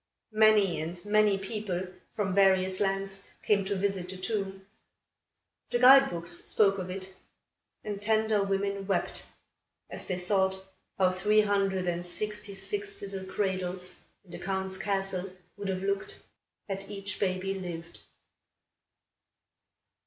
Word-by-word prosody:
Many 215 -5 +5
and 170 +3 -4
many 210 -1 +4
people 195 -2 -3 0.3
from 200 -3 0
various 190 -1 +4
lands 195 0 0 0.2
came 200 -2 +3
to 200 +1 -1
visit 190 -2 -1
the 190 - -6
tomb. 195 -1 -3 1.0
The - - +2
guide 270 +2 +8
books 170 0 -2
spoke 195 -2 +3
of 185 -1 -4
it, 190 +1 -6 0.7
and 205 -1 -4
tender 220 0 +2
women 200 0 -1
wept, 190 -4 -1 0.7
as - - -4
they 185 - -1
thought 190 +1 +1 0.3
how 185 -1 +4
three 210 +4 +3
hundred 195 -3 +1
and 175 0 -1
sixty 210 +3 -4
six 410 - -4
little 195 -1 -6
cradles, 185 -2 -1 0.3
in 180 - -17
the - - -7
Count's 190 0 -2
castle, 195 -1 -1 0.2
would 205 -1 -5
have 190 0 -2
looked, 200 0 -2 0.5
had 195 -1 -5
each 200 0 -5
baby 190 0 0
lived. 170 -2 -7
195 Hz, 130 wpm, -29 LUFS, 185-205 Hz, 1.0 s, guide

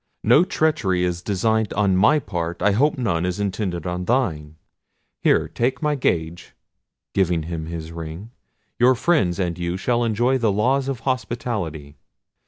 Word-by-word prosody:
No 155 - +6
treachery 110 - 0
is 90 -1 -1
designed 110 +3 0
on 100 -3 +2
my 105 +11 +5
part; 85 - -4
I 105 - +4
hope 140 +10 +2
none 90 -10 0
is 90 +1 -2
intended 95 -4 -2
on 90 0 -3
thine; 80 - -1 0.7
here - - +3
take 125 +6 -2
my 150 0 +2
gage" 85 - -2 0.6
(giving 90 -4 +1
him 80 -1 -5
his 80 -1 -6
ring): 85 +6 -8 0.5
"your 125 +1 +5
friends 125 - +1
and 90 -2 -2
you 85 +1 -2
shall 120 +4 0
enjoy 120 +4 +1
the 115 -3 +2
laws 130 +7 +1
of 135 -4 -3
hospitality. 105 - -3
100 Hz, 155 wpm, -22 LUFS, 85-120 Hz, 0.7 s, No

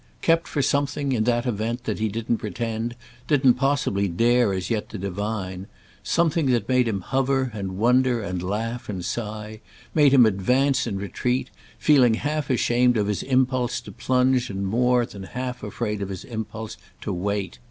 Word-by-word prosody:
Kept 165 0 +3
for 145 - -1
something, 140 0 0
in 110 -4 +1
that 120 0 +1
event, 115 +1 -2
that - - -3
he 110 0 0
didn't 115 +2 -1
pretend, 115 +3 -3 0.3
didn't 135 -3 +5
possibly 135 -9 +1
dare 115 +5 +3
as 95 +1 -3
yet 110 -2 -1
to - - -6
divine; 95 -1 -4 0.3
something 165 0 +1
that 120 -4 +1
made 125 -2 +3
him 100 -4 -1
hover 135 +2 0
and 95 -3 -5
wonder 125 +2 +3
and 90 -4 -4
laugh 115 +6 -3
and 95 -4 -4
sigh, 110 0 -5 0.3
made 145 -3 +5
him 130 -3 +7
advance 125 +6 +2
and 100 -4 -3
retreat, 125 +6 -2 0.3
feeling 130 -7 +5
half 150 +4 -2
ashamed 125 -1 +3
of 105 - +1
his 105 -1 -1
impulse 130 -2 +1
to - - -11
plunge 130 0 +1
and 100 -1 -3
more 125 +4 +2
than 100 -3 -10
half 125 +5 -5
afraid 105 0 -3
of 100 - -3
his 95 -2 -6
impulse 110 -1 -6 0.2
to - - -3
wait. 100 +2 -3
120 Hz, 175 wpm, -24 LUFS, 105-130 Hz, 0.3 s, him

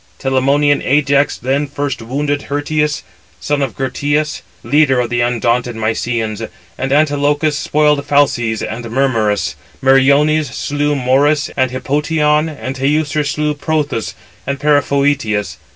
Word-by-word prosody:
Telamonian 140 +2 +2
Ajax 140 0 +2
then 135 +3 -1
first 140 -2 -3
wounded 145 +5 -2
Hyrtius, 150 +1 -1 0.4
son 145 -1 -1
of 135 -4 -2
Gyrtias, 145 +3 -1 0.2
leader 145 -3 +3
of 120 -1 -1
the 120 0 +1
undaunted 120 0 0
Mysians; 110 0 -2 0.3
and 135 +1 -3
Antilochus 145 +1 +2
spoiled 150 0 +1
Phalces 135 -6 +1
and 115 +3 -5
Mermerus; 115 -5 0 0.3
Meriones 140 +3 +3
slew 145 +3 -1
Morys 140 +3 +2
and 130 -2 +1
Hippotion; 150 +4 0
and 135 -3 -6
Teucer 150 +2 0
slew 150 +1 -1
Prothous 150 -5 -2 0.3
and 140 0 -2
Periphœtes. 140 - +1
140 Hz, 120 wpm, -16 LUFS, 130-150 Hz, 0.4 s, leader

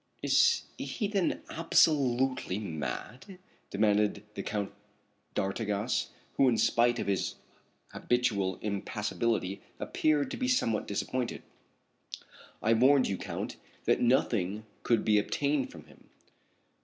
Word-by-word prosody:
"Is - - +4 0.2
he 215 - -2
then 200 -3 0
absolutely 135 - +2
mad?" 110 - -5 0.3
demanded 105 0 +1
the - - -4
Count 105 -2 -3 0.6
d'Artigas, 105 +3 -1 0.3
who 135 - +5
in 115 - +2
spite 120 +2 +3
of - - -2
his 100 -2 -1 0.5
habitual 100 -6 0
impassibility 105 0 -2 0.2
appeared 150 -2 +1
to - - -4
be 255 - -1
somewhat 115 - +1
disappointed. 120 +4 -2 1.2
"I 115 - +4
warned 130 +3 +5
you, 95 - -1
Count, - - -5 0.3
that - - +2
nothing 110 -4 +1 0.2
could 115 -3 +1
be 105 -1 +5
obtained 140 +5 0
from - - -12
him." - - -20
115 Hz, 115 wpm, -30 LUFS, 105-130 Hz, 1.2 s, who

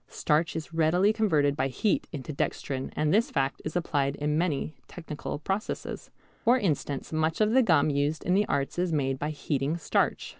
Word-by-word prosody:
Starch 160 +2 0
is 160 +1 -5
readily 175 +6 +3
converted 155 -10 +2
by 145 - 0
heat 165 - 0
into 145 -1 -6
dextrin, 135 -1 -3
and 150 +1 +1
this 220 +3 +3
fact 135 0 -1
is 155 - -5
applied 145 -5 0
in 150 +1 -1
many 155 -2 0
technical 160 -5 -6
processes. 195 +7 -4 0.3
For 245 +2 +5
instance 150 - -2
much 160 +1 0
of 215 0 +3
the 260 +3 +5
gum 160 - +3
used 145 +2 0
in 180 - +1
the 205 +2 +3
arts 140 +4 -1
is 180 -1 +1
made 135 -3 0
by 150 - -2
heating 145 0 -1
starch. 165 - 0
155 Hz, 185 wpm, -28 LUFS, 145-180 Hz, 0.3 s, For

